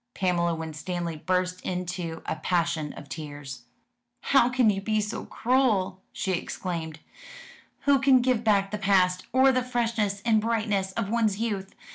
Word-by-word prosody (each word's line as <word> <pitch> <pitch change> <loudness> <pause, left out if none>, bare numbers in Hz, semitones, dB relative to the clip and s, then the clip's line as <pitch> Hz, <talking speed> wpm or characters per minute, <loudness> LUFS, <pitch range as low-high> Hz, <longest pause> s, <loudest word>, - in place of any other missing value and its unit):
Pamela 170 -2 +1
Winstanley 165 +1 -4
burst 180 +3 -1
into 180 -2 -4
a - - -2
passion 165 -2 0
of 145 - -11
tears. 140 -4 -8 0.6
"How 270 -3 +4
can 245 -3 +3
you 195 -1 -3
be 215 +2 0
so 210 +1 -3
cruel?" 215 -7 +1
she 190 - -2
exclaimed. 165 -3 -4 0.8
"Who 280 -1 +4
can 270 -1 +5
give 245 -2 +1
back 200 -3 +2
the 210 - -3
past, 185 -2 +2
or 265 +1 +5
the 255 -1 +1
freshness 230 -5 -1
and 220 -2 +4
brightness 210 -4 0
of 210 -1 -2
one's 220 -4 +1
youth? 205 -4 -3
195 Hz, 150 wpm, -27 LUFS, 170-230 Hz, 0.8 s, can